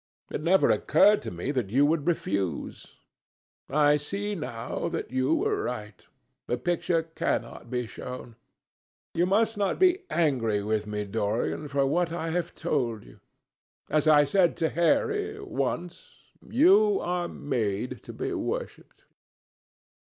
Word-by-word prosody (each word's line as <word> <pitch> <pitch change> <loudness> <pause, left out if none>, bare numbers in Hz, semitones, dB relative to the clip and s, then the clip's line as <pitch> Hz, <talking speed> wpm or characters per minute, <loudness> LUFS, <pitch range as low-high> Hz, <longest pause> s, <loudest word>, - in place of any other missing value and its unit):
It - - -3
never 180 +4 +4
occurred 210 0 +4
to - - -5
me 90 +10 -4
that 125 -8 -2
you 135 +7 +4
would 155 0 0
refuse. 100 - -2 0.8
I 145 +1 +4
see 200 +8 -4
now 125 - -4
that 165 -6 -4
you 130 0 +2
were - - 0
right. 105 -5 -5 0.4
The 120 - 0
picture 165 +4 0
cannot 160 -6 -3
be 125 0 -2
shown. 120 0 -8 0.8
You 175 +2 +2
must 220 +2 +2
not 200 -1 +1
be 370 0 +4
angry 120 -11 +1
with 105 0 -1
me, 105 0 -3
Dorian, 110 +8 -2
for 140 -1 +1
what 170 +4 +1
I 165 -1 -3
have 175 +1 -2
told 125 -10 -1
you. - - -16 0.7
As 155 0 +2
I 145 -1 +6
said 175 +3 +2
to 160 - +1
Harry, 420 - +1
once, 480 +4 -4 0.4
you 395 - +5
are 175 -1 -1
made 120 -4 -3
to - - -9
be - - -4
worshipped." - - -5
150 Hz, 140 wpm, -27 LUFS, 120-180 Hz, 0.8 s, I